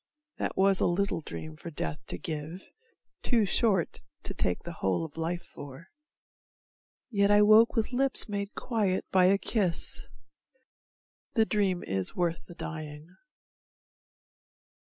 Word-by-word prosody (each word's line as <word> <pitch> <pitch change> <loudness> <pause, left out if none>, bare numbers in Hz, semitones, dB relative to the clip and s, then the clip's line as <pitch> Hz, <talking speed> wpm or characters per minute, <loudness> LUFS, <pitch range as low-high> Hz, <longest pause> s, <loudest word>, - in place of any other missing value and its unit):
That - - -3
was 195 0 +4
a - - +3
little 190 0 0
dream 155 0 -8
for 170 - -8
Death 150 -1 -4
to - - -2
give, 160 0 -6 0.6
Too 230 -4 +2
short 195 -2 +1 0.2
to - - -1
take 90 - -1
the 170 - -6
whole 95 - +1
of 150 - -11
life 170 +2 -3
for, 145 +3 -11 1.2
yet 200 -2 +3
I 205 0 +6
woke 215 +2 +6
with 225 0 0
lips 265 +1 +4
made 200 -1 -4
quiet 205 -6 -1
by 185 -1 +5
a 195 +2 +5
kiss. 195 -5 0 1.3
The 225 -2 +4
dream 195 -5 0
is 95 -1 -3
worth 170 -2 -1
the 175 - -11
dying. 155 +1 -7
185 Hz, 135 wpm, -29 LUFS, 160-205 Hz, 1.3 s, I